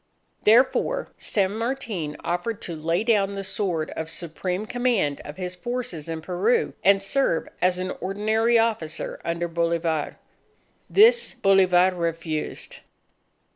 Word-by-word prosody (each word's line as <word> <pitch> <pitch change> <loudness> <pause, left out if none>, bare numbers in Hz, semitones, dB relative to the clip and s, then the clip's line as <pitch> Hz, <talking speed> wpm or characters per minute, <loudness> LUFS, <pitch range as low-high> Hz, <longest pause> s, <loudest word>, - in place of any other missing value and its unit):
Therefore, 260 - +3
San 200 -1 0
Martin 225 - -3
offered 175 +6 -2
to 170 - -4
lay 165 +5 0
down 200 -4 +2
the 195 - -4
sword 180 -5 -2
of 160 0 -5
supreme 180 +4 -4
command 235 - 0
of 150 - -9
his 180 -1 -5
forces 180 -6 -4
in 160 -1 -4
Peru, 190 +8 +1
and 195 0 +4
serve 195 -6 +1
as 180 0 +3
an 185 0 -3
ordinary 220 +5 +1
officer 215 -9 -1
under 170 +1 -2
Bolivar. 165 -2 -1 0.7
This 470 +4 +5
Bolivar 190 -2 +4
refused. 165 -2 -3
185 Hz, 125 wpm, -24 LUFS, 170-220 Hz, 0.7 s, This